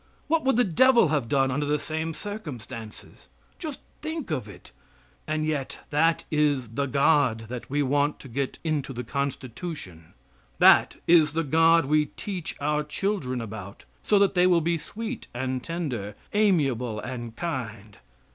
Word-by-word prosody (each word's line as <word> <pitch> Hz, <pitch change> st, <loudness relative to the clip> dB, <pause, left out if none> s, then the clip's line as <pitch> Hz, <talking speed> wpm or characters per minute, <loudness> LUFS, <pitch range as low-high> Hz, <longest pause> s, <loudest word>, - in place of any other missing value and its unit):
What 320 Hz, +1 st, +2 dB
would 270 Hz, -, +3 dB
the 245 Hz, -, +4 dB
devil 235 Hz, -, +5 dB
have 140 Hz, -7 st, 0 dB
done 135 Hz, 0 st, +2 dB
under 145 Hz, +3 st, -1 dB
the 150 Hz, +1 st, +2 dB
same 160 Hz, +2 st, -3 dB
circumstances? 130 Hz, -, -8 dB, 0.3 s
Just 310 Hz, -5 st, -6 dB, 0.2 s
think 315 Hz, -, -4 dB
of 130 Hz, -9 st, -2 dB
it, -, -, -13 dB, 0.6 s
and 155 Hz, 0 st, -1 dB
yet 150 Hz, -4 st, -3 dB
that 165 Hz, +3 st, +2 dB
is 145 Hz, -6 st, +1 dB
the 140 Hz, +5 st, -2 dB
God 135 Hz, -4 st, +3 dB
that 125 Hz, -1 st, -6 dB
we 145 Hz, +2 st, +1 dB
want 145 Hz, +2 st, +1 dB
to -, -, -10 dB
get 135 Hz, +2 st, -3 dB
into 150 Hz, -4 st, -1 dB
the 125 Hz, 0 st, -4 dB
Constitution. 130 Hz, -, -5 dB, 0.4 s
That -, -, +6 dB
is 160 Hz, -3 st, +5 dB
the 165 Hz, +1 st, 0 dB
God 165 Hz, +1 st, +4 dB
we 150 Hz, +1 st, +2 dB
teach 185 Hz, -6 st, -5 dB
our 150 Hz, +1 st, +1 dB
children 150 Hz, -, -2 dB
about 100 Hz, -3 st, -8 dB, 0.2 s
so 210 Hz, -, +3 dB
that 200 Hz, 0 st, +4 dB
they 180 Hz, -1 st, +4 dB
will 175 Hz, -2 st, +5 dB
be 170 Hz, +1 st, 0 dB
sweet 220 Hz, +8 st, -6 dB
and 130 Hz, 0 st, -2 dB
tender, 125 Hz, -, -4 dB, 0.2 s
amiable 135 Hz, -, +2 dB
and 120 Hz, -1 st, -6 dB
kind! 115 Hz, -, -5 dB
145 Hz, 155 wpm, -26 LUFS, 125-170 Hz, 0.6 s, That